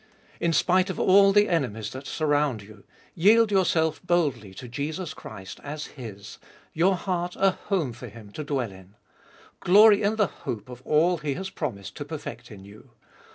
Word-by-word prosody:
In 170 - +1
spite 180 +4 +2
of 190 - -4
all 195 +1 +6
the 205 +1 +4
enemies 110 - -1
that 130 +1 -8
surround 145 -7 0
you, 105 0 -16 0.3
yield 215 +5 +4
your 190 -2 +3
self 160 -2 +1
boldly 155 - 0
to 125 - -9
Jesus 155 +7 -4
Christ 100 -3 -10
as 150 +1 -6
His 110 -7 -9 0.2
— - - -29
your 185 +4 +3
heart 180 -1 -3
a 195 0 +3
home 180 - -2
for 115 - -9
Him 110 -3 -13
to 155 - -6
dwell 135 -7 -2
in. 95 +1 -16 0.6
Glory 205 +3 +6
in 210 +1 +1
the 215 -2 +3
hope 120 - -7
of 125 0 -10
all 170 +4 +3
that 150 -1 -9
He 140 - 0
has 190 +1 -5
promised 100 - -5
to - - -5
perfect - - -8
in 95 -2 -12
you. 100 +2 -15
155 Hz, 190 wpm, -26 LUFS, 115-185 Hz, 0.6 s, all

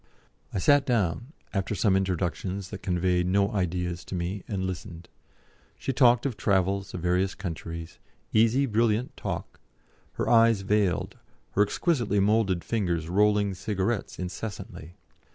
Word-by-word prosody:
I - - -3
sat 145 +8 +4
down, 120 - 0 0.2
after 100 +1 -1
some 95 +1 +3
introductions 95 +1 -2
that 100 -2 -7
conveyed 90 -1 +1
no 100 +3 +2
ideas 90 -3 -2
to - - -6
me, 90 +3 -3
and 95 -3 -2
listened. 90 -2 -6 0.7
She 135 - -2
talked 125 -2 +4
of 130 -5 -1
travels, 100 -1 0
of 90 - -5
various 90 +2 +1
countries, 85 -2 -6 0.3
easy 115 +5 +4
brilliant 115 0 +1
talk, - - -5 0.5
her - - -2
eyes 115 -3 +5
veiled, 100 -3 0 0.3
her 100 - +2
exquisitely 110 - +1
moulded 100 -3 +2
fingers 85 -7 -1
rolling 105 +1 +3
cigarettes 100 +3 -2
incessantly. 90 -2 -6
100 Hz, 135 wpm, -27 LUFS, 90-110 Hz, 0.7 s, eyes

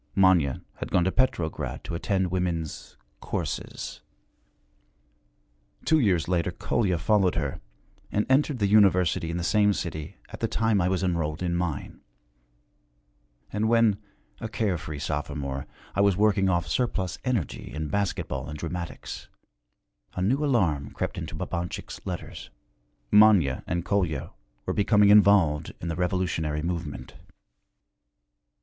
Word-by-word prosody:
Manya 90 -8 +3
had - - -5
gone 90 - +3
to 95 - +1
Petrograd 90 -11 -1
to - - -6
attend 95 +1 0
women's 85 -4 -3 0.2
'courses.' - - -4 1.8
Two 160 0 +4
years 90 - +2
later 85 -2 +1
Kolya 100 -7 0
followed 95 +2 +2
her, 75 -5 -2 0.5
and 105 - +1
entered 135 +1 +3
the 105 - +1
University 95 -5 +4
in 85 - -2
the 85 - -2
same 105 +2 +3
city 80 -5 -5
at - - -9
the - - 0
time 110 -3 +1
I 90 - +2
was 95 0 0
enrolled 85 -2 -1
in 85 -1 0
mine. 85 -5 -3 1.5
And 105 +2 +1
when, 115 -3 +3 0.4
a 115 - -5
care 105 -5 -1
free 75 -2 -6
sophomore, 70 -2 -3 0.3
I 100 - +1
was 100 -2 +3
working 100 -2 +3
off 85 -2 +1
surplus 95 -3 -1
energy 120 - -2
in 75 +1 -4
basket 100 +3 -1
ball 70 +2 -4
and 75 - -6
dramatics, 85 +2 -6 0.9
a 90 - -2
new 130 +10 +2
alarm 90 - +1
crept - - -3
into - - -6
Babanchik's 85 +1 -4
letters. - - -6 0.6
Manya 100 -11 +5
and 85 0 -2
Kolya 90 -9 -1 0.3
were - - -1
becoming 105 0 +4
involved 100 -7 +5
in 85 - -4
the 85 - -2
revolutionary 90 -4 -1
movement. 85 -7 -4
90 Hz, 135 wpm, -26 LUFS, 80-105 Hz, 1.8 s, Manya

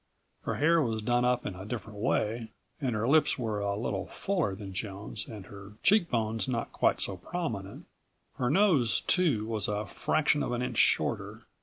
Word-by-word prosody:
Her - - -1
hair 165 +2 +4
was 110 -5 -1
done 120 +2 +2
up 125 0 +1
in - - -3
a 95 +1 -8
different 105 -1 -6
way, 110 +1 0 0.3
and 125 -5 0
her 110 +2 0
lips 155 +3 +4
were 110 -5 -2
a 100 0 -1
little 110 - -2
fuller 175 - -1
than 95 -1 -8
Joan's 100 +2 -5
and 105 -5 -8
her 100 +1 -11
cheekbones 115 - +2
not 120 -3 -2
quite - - +2
so 95 - -1
prominent. 110 - -5 0.5
Her 125 - +1
nose, 150 - +3
too, 150 - +2
was 110 -2 -1
a 105 +1 -1
fraction 150 +8 +1
of - - -1
an 120 +1 -1
inch 125 -3 -2
shorter. - - +1
115 Hz, 180 wpm, -30 LUFS, 105-135 Hz, 0.5 s, hair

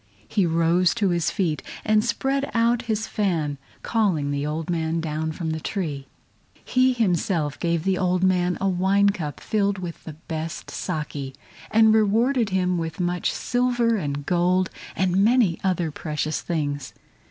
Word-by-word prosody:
He 200 -5 +1
rose 170 +3 +3
to 205 -4 +1
his 170 -3 +1
feet 160 -7 -1 0.2
and 215 0 +3
spread 275 +4 -1
out 230 +1 +3
his 220 0 0
fan, 165 -11 -1 0.2
calling 185 -11 +1
the 145 +1 -1
old 155 +1 -3
man 165 -1 -1
down 160 0 -2
from 160 0 -3
the 160 - -2
tree. 150 -7 -4 0.6
He 255 0 +3
himself 175 - 0
gave 170 -2 0
the 190 0 +1
old 185 0 +1
man 180 -1 +2
a 195 - 0
wine 195 +2 +3
cup 165 -8 -4
filled 200 -2 0
with 175 -2 -7
the 160 - -7
best 160 -1 -6
SAKE, 145 -4 -4 0.3
and 220 0 +5
rewarded 225 +3 +3
him 180 -2 +1
with 165 0 -4
much 180 0 0
silver 245 -2 +1
and 145 -7 -3
gold 180 +2 +2 0.2
and 185 +1 +2
many 225 -6 +3
other 175 -4 0
precious 155 +1 -3
things. 145 -5 -3
180 Hz, 155 wpm, -24 LUFS, 160-210 Hz, 0.6 s, and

